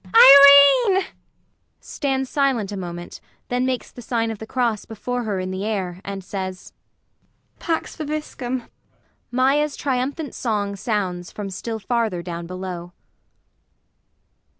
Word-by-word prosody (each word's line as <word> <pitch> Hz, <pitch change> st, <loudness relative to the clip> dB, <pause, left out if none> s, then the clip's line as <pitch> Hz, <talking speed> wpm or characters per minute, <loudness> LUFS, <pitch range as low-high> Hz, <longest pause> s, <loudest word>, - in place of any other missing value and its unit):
] 280 Hz, -, +9 dB
Irene! 385 Hz, -1 st, +2 dB, 0.8 s
[Stands 265 Hz, -2 st, -2 dB
silent 255 Hz, -8 st, 0 dB
a -, -, -4 dB
moment, 175 Hz, -2 st, -7 dB, 0.3 s
then 250 Hz, +1 st, 0 dB
makes 255 Hz, -1 st, -3 dB
the 245 Hz, -, -11 dB
sign 230 Hz, -1 st, -1 dB
of 220 Hz, -, -7 dB
the 220 Hz, -, -8 dB
cross 235 Hz, -4 st, -1 dB
before 245 Hz, +3 st, -4 dB
her 205 Hz, -3 st, -2 dB
in 185 Hz, 0 st, -4 dB
the 190 Hz, +1 st, -4 dB
air, 190 Hz, -4 st, -3 dB
and 195 Hz, -2 st, -6 dB
says. 185 Hz, -1 st, -6 dB, 0.9 s
Pax 330 Hz, -1 st, -3 dB
vobiscum! 290 Hz, -5 st, -4 dB, 0.7 s
[MAIA's 275 Hz, +4 st, +2 dB
triumphant 280 Hz, +3 st, -2 dB
song 205 Hz, -4 st, -2 dB
sounds 190 Hz, -4 st, -3 dB
from 200 Hz, -2 st, -6 dB
still 225 Hz, +4 st, -5 dB
farther 220 Hz, -5 st, -1 dB
down 170 Hz, -1 st, -6 dB
below. 180 Hz, -1 st, -7 dB
225 Hz, 125 wpm, -22 LUFS, 190-265 Hz, 0.9 s, ]